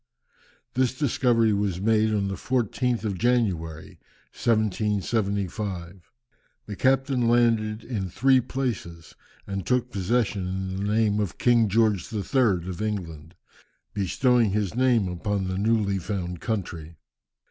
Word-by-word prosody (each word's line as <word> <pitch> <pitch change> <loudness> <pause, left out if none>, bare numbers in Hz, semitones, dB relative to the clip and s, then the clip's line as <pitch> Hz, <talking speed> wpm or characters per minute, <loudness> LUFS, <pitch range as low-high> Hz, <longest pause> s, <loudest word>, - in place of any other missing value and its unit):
This 130 0 0
discovery 120 -5 +2
was 100 -3 -1
made 110 +1 +2
on 100 -2 0
the 95 - -3
14th 125 +2 -1
of 100 -4 -2
January, 90 -10 -1 0.3
1775. 100 -4 -1 0.5
The 105 - -6
captain 130 0 +2
landed 115 -2 +2
in 100 -7 -4
three 130 +8 +4
places 115 -11 -4 0.3
and 100 -1 -4
took 125 +2 0
possession 100 -1 0
in 95 0 -3
the 100 +1 -2
name 105 -1 +2
of 100 -5 -2
King 120 -3 +3
George 105 -3 +1
III. 105 -4 +1
of 95 +2 -5
England, 85 -6 -5 0.6
bestowing 115 +4 +2
his 105 -3 -1
name 120 -4 +2
upon 95 +3 -2
the 95 +1 -2
newly 105 -2 +1
found 90 -2 -4
country. 85 -7 -4
105 Hz, 125 wpm, -25 LUFS, 95-120 Hz, 0.6 s, three